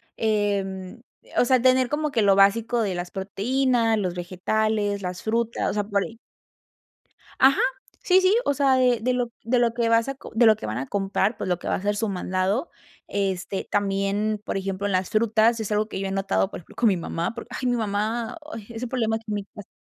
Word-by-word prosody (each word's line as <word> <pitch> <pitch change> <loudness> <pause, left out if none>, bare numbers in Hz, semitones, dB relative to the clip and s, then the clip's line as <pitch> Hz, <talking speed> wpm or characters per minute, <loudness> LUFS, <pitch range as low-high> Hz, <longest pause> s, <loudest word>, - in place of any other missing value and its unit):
em, 200 -2 -1 0.2
eh, - - -21
o - - +5
sea, 255 0 +4
tener 255 0 +3
como 300 0 -1
que 230 - +1
lo 200 -1 +5
básico 225 +4 +3
de 200 -3 -1
las 175 0 -4
proteínas, 225 +4 0
los 185 -4 -1
vegetales, 205 +3 -1
las 180 -1 -5
frutas, 230 +1 0
o - - -4
sea, 205 0 0
por 200 -1 0
ahí. 225 -1 -9 1.2
Ajá, 270 +1 +5 0.4
sí, 370 +1 +5
sí, 375 +3 +4
o - - +2
sea, 270 -2 +3
eh, 250 -2 +3
de 255 +2 +1
lo 245 -1 -1
de 240 +2 +2
lo 235 -1 +2
que 235 -1 0
vas 230 +2 +3
a 275 - -3
co - - -12
de 235 +1 +5
lo 220 -1 +7
que - - -8
van 110 +2 -3
a 135 - -4
comprar, 200 +2 0
pues, - - -4
lo 180 -1 0
que - - -7
va - - +1
a - - -4
ser 205 +1 0
su 215 0 -1
mandado. 185 - -1 0.4
Este, 195 -1 -2
también, 205 +1 0
por - - -2
ejemplo, 195 +1 -2
en 200 - -2
las 185 0 0
frutas 225 +1 +3
es 215 -1 -4
algo 210 +1 +1
que - - -5
yo 195 - -2
he - - -4
notado, 195 0 0
por - - -7
ejemplo, 165 - -17
con 235 - +2
mi 190 - +1
mamá, 170 +3 -3
porque 235 +1 -9
ay, 255 - -1
mi 245 - +2
mamá, 220 +4 -2 0.2
ay, 220 - -7
es 230 +1 -6
un 250 - -4
problema 225 -3 0
aquí 225 - -16
en 210 - -2
mi 205 - -3
casa. 205 -1 -12
215 Hz, 235 wpm, -24 LUFS, 195-235 Hz, 1.2 s, lo